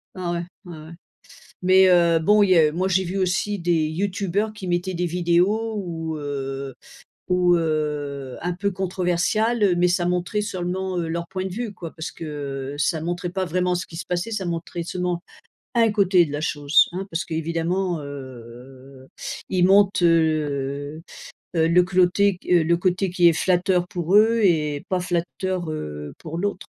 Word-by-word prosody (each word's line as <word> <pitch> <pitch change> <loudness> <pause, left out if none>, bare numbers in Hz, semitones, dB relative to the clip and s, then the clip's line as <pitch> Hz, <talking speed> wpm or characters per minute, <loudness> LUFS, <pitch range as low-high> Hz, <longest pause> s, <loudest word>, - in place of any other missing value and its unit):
Ah 180 -2 -3
ouais? 170 0 -2 0.2
Ouais, 175 -2 -9
ouais 155 +1 -11 0.7
mais 185 +1 +6
heu, 170 -2 +4
bon 210 +6 +4
il 200 - +3
y 180 - +6
a 155 -2 +4
moi 185 +4 0
j'ai 190 0 +2
vu 185 +2 -3
aussi 195 +2 0
des 170 -3 +1
youtubeurs 200 +4 -2
qui 195 -3 -7
mettaient 175 +2 -1
des 175 +1 -1
vidéos 180 +6 +1
où, 165 -5 -4
heu 135 -2 -5 0.5
où, 180 -1 +3
heu 150 -4 -2
un 180 - -1
peu 200 +3 -1
controversiales, 190 +5 0
heu, 195 -3 +4
mais 175 +1 +3
ça 175 0 +1
montrait 180 +4 -1
seulement, 185 -2 -3
heu, 165 -1 -2
leur 170 +1 -3
point 190 0 -4
de - - -2
vue 225 +1 -4
quoi. 170 -4 -8
Parce 160 - -5
que 140 -3 -6
ça 155 +2 0
montrait 175 +2 -3
pas 190 +1 -2
vraiment 180 +1 0
ce 175 - -3
qui 165 - -11
se 175 - -5
passait, 180 +5 -2
ça 210 -4 -3
montrait 170 0 -4
seulement 180 0 -3 0.5
1 230 -2 +4
côté 190 -4 +4
de 150 - -8
la 145 +1 -3
chose, 145 -1 +3
hein. 190 +2 -4
Parce 165 +1 -2
que 160 - -5
évidemment, 170 +2 -1
heu, 130 -1 -11 0.4
ils 180 -1 +3
montent, 200 0 +4
heu 150 -3 0 0.5
heu, 160 -1 +3
le 175 +2 +5
côté, 185 +1 +2
heu, 175 -2 +5
le 170 +2 +2
côté 185 +2 0
qui 175 0 +3
est - - +4
flatteur 180 +1 +1
pour 175 +1 -2
eux 225 +2 +5
et 150 -5 +1
pas 185 -1 0
flatteur, 175 0 -2
heu, 75 - -6
pour 165 +1 -6
l'autre. 200 +3 -3
175 Hz, 180 wpm, -23 LUFS, 160-185 Hz, 0.7 s, mais